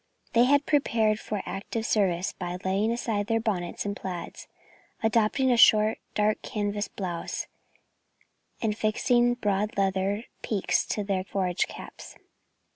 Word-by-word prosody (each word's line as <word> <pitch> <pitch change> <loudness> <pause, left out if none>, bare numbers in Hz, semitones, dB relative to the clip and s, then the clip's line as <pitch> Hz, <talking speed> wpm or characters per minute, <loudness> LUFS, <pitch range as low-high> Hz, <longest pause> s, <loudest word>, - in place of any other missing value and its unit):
They 235 +1 +6
had 285 +2 +3
prepared 225 -7 +2
for 210 -2 -4
active 220 +4 -4
service 190 -4 +1
by 180 -1 -5
laying 195 +4 +1
aside 220 -3 -1
their 225 0 +2
bonnets 195 -6 -2
and 200 0 -2
plaids, 180 -4 -6 0.6
adopting 230 +4 +2
a 240 - +3
short 215 -1 +6 0.2
dark 210 0 +1
canvas 205 -1 -2
blouse 175 -4 -4 1.2
and 215 -2 +1
fixing 240 +3 +2
broad 210 -2 -1
leather 195 +2 0 0.2
peaks 205 -4 0
to 210 - -1
their 195 -2 -1
forage 185 -2 -1
caps. - - -10
210 Hz, 130 wpm, -27 LUFS, 195-225 Hz, 1.2 s, They